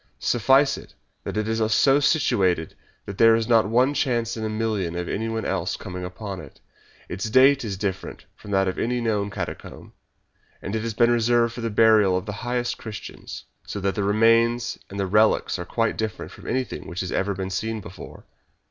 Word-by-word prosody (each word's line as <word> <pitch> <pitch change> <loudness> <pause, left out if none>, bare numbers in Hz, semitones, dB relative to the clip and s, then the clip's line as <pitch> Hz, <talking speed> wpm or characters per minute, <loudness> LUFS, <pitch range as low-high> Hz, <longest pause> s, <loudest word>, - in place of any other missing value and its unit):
Suffice 135 +4 +3
it - - -16 0.3
that - - -4
it 110 0 -1
is 110 0 -1
so 135 +6 +4
situated 95 - +1 0.3
that 100 -1 -8
there 115 0 +7
is 115 -1 -1
not 115 -4 +4
one 125 +5 +3
chance 120 -5 0
in 110 - -5
a 110 - -1
million 110 -6 -2
of 90 0 -3
anyone 110 +1 -3
else - - -2
coming 90 0 -7
upon 95 +1 -6
it. - - -13 0.5
Its 95 +4 -4
date 135 +4 +5
is 100 -4 -4
different 95 -1 -4
from - - -13
that 95 -1 +2
of 95 - -2
any 125 +1 0
known 105 -3 -1
catacomb, - - -7 0.7
and 100 - -5
it 110 - -1
has 115 -1 -4
been 120 +1 +4
reserved 120 0 +2
for 120 - -7
the 115 - -1
burial 105 -3 +4
of 95 - -4
the 105 - -4
highest 120 0 -2
Christians, 110 -2 -8 0.2
so 105 - -4
that 100 0 0
the 105 - -2
remains 115 +3 +2
and 100 - -7
the 100 - 0
relics 105 -1 +2
are 90 - -5
quite 115 +4 -1
different 110 -4 -4
from - - -13
anything 130 0 -3
which 85 +2 -4
has 90 - -4
ever 100 +1 -1
been 95 0 -4
seen 110 +4 -2
before. 90 -2 -11
110 Hz, 200 wpm, -24 LUFS, 100-115 Hz, 0.7 s, there